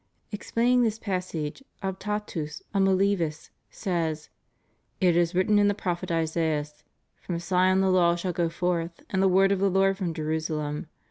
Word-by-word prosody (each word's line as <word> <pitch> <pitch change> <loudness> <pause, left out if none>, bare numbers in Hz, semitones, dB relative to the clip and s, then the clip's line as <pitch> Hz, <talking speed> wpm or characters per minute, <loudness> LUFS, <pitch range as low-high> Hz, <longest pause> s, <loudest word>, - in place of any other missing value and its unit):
* - - -44
Explaining 240 +4 +1
this 225 -2 +1
passage, 185 - -4 0.2
Optatus 190 -5 -4
of 195 - +2
Milevis 190 -5 +1 0.2
says: 165 -5 -2 0.7
"It 180 -3 +3
is 175 +1 +2
written 205 +3 +3
in 205 - +4
the 205 - +2
prophet 175 -3 -3
Isaias: 160 -2 -1 0.2
' - - -49
From 175 - -3
Sion 185 +2 +2
the 190 -1 +3
law 175 -2 +4
shall 175 +1 -3
go 170 0 0
forth, 170 0 -2
and 190 - +1
the 195 - +5
word 190 +1 +4
of 200 - +1
the 200 0 +3
Lord 195 +1 +2
from 180 -4 -1
Jerusalem.' 155 -1 -2
180 Hz, 165 wpm, -27 LUFS, 165-195 Hz, 0.7 s, the